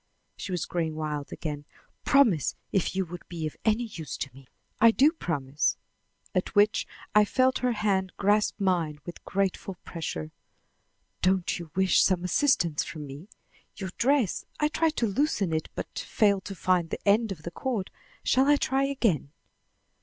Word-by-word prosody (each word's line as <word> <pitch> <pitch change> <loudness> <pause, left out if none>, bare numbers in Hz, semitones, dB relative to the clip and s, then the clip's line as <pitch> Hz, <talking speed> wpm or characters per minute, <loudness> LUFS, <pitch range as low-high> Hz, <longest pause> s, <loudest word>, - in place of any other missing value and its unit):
She 195 - -6
was 180 -3 -1
growing 165 -3 -2
wild 150 -2 -4
again. 150 -2 -5 0.4
"Promise, 225 - +4 0.2
if 190 -1 0
you 190 0 +1
would 175 +1 -8
be 165 -2 -4
of 155 - -4
any 220 +2 +2
use 175 -9 -6
to 135 - -5
me." 135 0 -15 0.3
"I 230 - +8
do 275 +7 +5
promise." 145 - -1 0.6
At 185 +3 -1
which 205 +1 +4 0.3
I 210 - +7
felt 255 +4 +2
her 250 -1 +1
hand 195 -4 0
grasp 210 +2 +2
mine 175 -6 +1
with 175 - -9
grateful 195 0 -1
pressure. 80 - -5 0.9
"Don't 185 -1 +1
you 170 -2 -8
wish 190 0 +4
some 185 -2 +2
assistance 175 - +2
from 155 -2 -7
me? 145 +8 -10 0.5
Your 190 -3 -5
dress 260 -5 +2 0.2
I 300 - +2
tried 320 0 +1
to 235 - +1
loosen 210 - 0
it, 160 0 -2
but - - -5
failed 200 -3 +1
to 195 - -6
find 180 -2 +1
the - - -6
end 215 +2 +4
of 160 -6 -7
the 170 - -5
cord. 225 -1 -3 0.3
Shall 265 +2 +3
I 290 - +6
try 270 -1 +1
again?" 230 - 0
190 Hz, 170 wpm, -27 LUFS, 165-225 Hz, 0.9 s, I